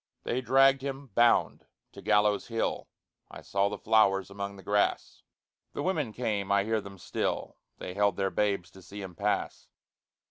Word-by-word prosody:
They 125 - -1
dragged 135 +2 +4
him, 135 0 -5
bound, 120 +3 +3 0.2
to - - -11
Gallows 105 -1 +2
Hill 115 -1 -2 0.4
(I - - -10
saw 100 0 0
the 105 - -5
flowers 100 -3 +2
among 100 0 -5
the 95 - -13
grass); 105 0 0 0.5
The - - -3
women 155 -10 -1
came, 105 -4 -2
I 100 0 +4
hear 110 +1 0
them 100 0 -11
still, - - -3 0.2
They 90 - -6
held 100 +1 +2
their 95 -1 0
babes 100 -4 -1
to 95 - -15
see 100 +2 -9
him 95 -2 -8
pass. 100 +5 -2
105 Hz, 170 wpm, -29 LUFS, 100-120 Hz, 0.5 s, dragged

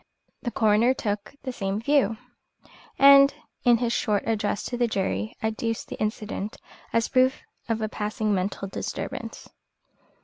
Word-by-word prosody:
The 240 - -2
coroner 225 +3 +3
took 205 +2 -3
the 260 - -3
same 195 -2 -2
view, 265 -2 +2 0.8
and 275 0 +8 0.3
in 240 -2 +5
his 235 0 0
short 210 -4 +1
address 210 -2 0
to 245 - -4
the 240 0 +1
jury 110 - -2
adduced 225 +1 -2
the - - -7
incident 215 -1 -3 0.3
as 230 -1 +2
proof 260 +1 +2 0.3
of 225 -1 0
a - - 0
passing 215 0 -2
mental 195 +1 -2
disturbance. 190 - -5
220 Hz, 140 wpm, -26 LUFS, 205-245 Hz, 0.8 s, and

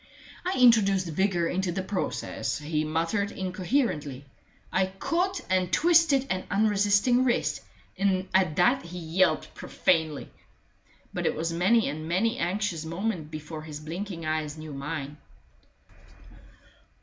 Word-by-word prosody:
I 370 +1 -1
introduced 200 -7 +5
vigor 175 0 +1
into 185 0 -1
the 190 +2 -3
process: 190 0 -3
he 150 +1 -2
muttered 165 +6 -1
incoherently. 185 - -2 0.5
I 190 0 +2
caught 345 - -1
and 185 -1 +1
twisted 325 -5 +4
an 185 0 -2
unresisting 205 +4 +3
wrist 250 -2 0 0.4
and 190 -1 +1
at 185 -5 +3
that 245 +9 +3
he 175 +1 -8
yelped 175 +2 +1
profanely. 160 -4 0 0.8
But - - -1
it - - 0
was 165 +1 -2
many 200 +7 +3
and 155 +2 -4
many 220 +8 +1
an 170 - +1
anxious 190 -4 -2
moment 170 -1 -3
before 155 0 -7
his 155 -1 -8
blinking 165 +2 -6
eyes 155 -1 -2
knew 155 -1 -8
mine. 140 +1 -5
185 Hz, 130 wpm, -27 LUFS, 160-205 Hz, 0.8 s, introduced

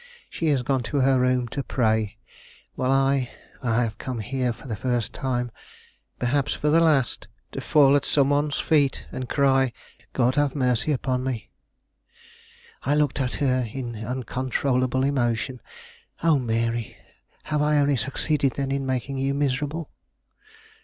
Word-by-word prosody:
She 165 - -2
has 140 -4 +2
gone 135 0 +1
to 145 -2 +1
her 130 0 +4
room 125 -1 +2
to 140 - -3
pray, 110 -4 0 0.6
while 130 - -1
I 135 -1 +2 0.3
I 120 -1 +2
have 110 -3 -4
come 130 -2 -4
here 125 +3 -1
for 115 - -11
the 110 - -3
first 120 0 -1
time, 125 -2 -2 0.7
perhaps 135 +3 0
for 150 - 0
the 165 - +5
last, 150 -7 +2 0.2
to - - -5
fall 145 -2 +5
at 145 - +2
some 140 -1 +2
one's 145 0 +1
feet 145 -4 +2
and 130 -1 -5
cry, 135 -2 +3 0.4
'God 125 0 +2
have 145 0 +1
mercy 125 +1 +1
upon 130 -2 -1
me!'" 130 -5 -4 1.3
I 145 +3 +1
looked 150 -2 +1
at 125 -1 -1
her 130 -3 +1
in 120 -2 -5
uncontrollable 130 +2 -1
emotion. 130 -2 0 0.6
"Oh, 160 -4 +4
Mary, 115 -1 -1 0.5
have 150 -1 -1
I 150 0 +3
only 145 -1 +3
succeeded, 135 +3 0
then, 135 -1 -2
in 135 -1 -1
making 130 +1 -2
you 135 +1 0
miserable?" 145 +3 -1
130 Hz, 155 wpm, -25 LUFS, 125-140 Hz, 1.3 s, the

